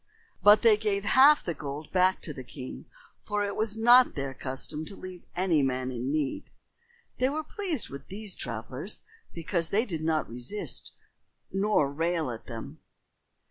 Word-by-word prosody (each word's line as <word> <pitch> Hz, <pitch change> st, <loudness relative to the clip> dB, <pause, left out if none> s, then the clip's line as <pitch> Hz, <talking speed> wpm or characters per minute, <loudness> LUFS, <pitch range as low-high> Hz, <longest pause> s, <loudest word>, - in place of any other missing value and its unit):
But 205 Hz, +3 st, +7 dB
they 225 Hz, -2 st, +7 dB
gave 205 Hz, -2 st, 0 dB
half 275 Hz, +7 st, +6 dB
the 170 Hz, -, -2 dB
gold 145 Hz, 0 st, -7 dB
back 185 Hz, 0 st, +3 dB
to 150 Hz, -, -5 dB
the 130 Hz, -, -8 dB
king, 130 Hz, 0 st, -8 dB, 0.4 s
for 205 Hz, -1 st, -1 dB
it 200 Hz, -, -3 dB
was 220 Hz, 0 st, 0 dB
not 240 Hz, +3 st, +6 dB
their 140 Hz, -2 st, -3 dB
custom 135 Hz, +4 st, -3 dB
to 195 Hz, -, -8 dB
leave 185 Hz, -2 st, -10 dB
any 175 Hz, -4 st, +2 dB
man 130 Hz, -1 st, -1 dB
in 125 Hz, +2 st, -3 dB
need. 150 Hz, -3 st, -2 dB, 0.7 s
They 255 Hz, +1 st, +3 dB
were 310 Hz, +2 st, -2 dB
pleased 350 Hz, -, -3 dB
with 140 Hz, -, -9 dB
these 200 Hz, 0 st, -5 dB
travelers 125 Hz, -, -4 dB, 0.3 s
because 165 Hz, 0 st, -2 dB
they 220 Hz, +4 st, +2 dB
did 165 Hz, -8 st, -4 dB
not 160 Hz, -1 st, +1 dB
resist 125 Hz, -, -4 dB, 0.6 s
nor 195 Hz, -8 st, +2 dB
rail 165 Hz, -2 st, 0 dB
at 115 Hz, -, -9 dB
them. 115 Hz, -2 st, -8 dB
175 Hz, 165 wpm, -28 LUFS, 140-210 Hz, 0.7 s, But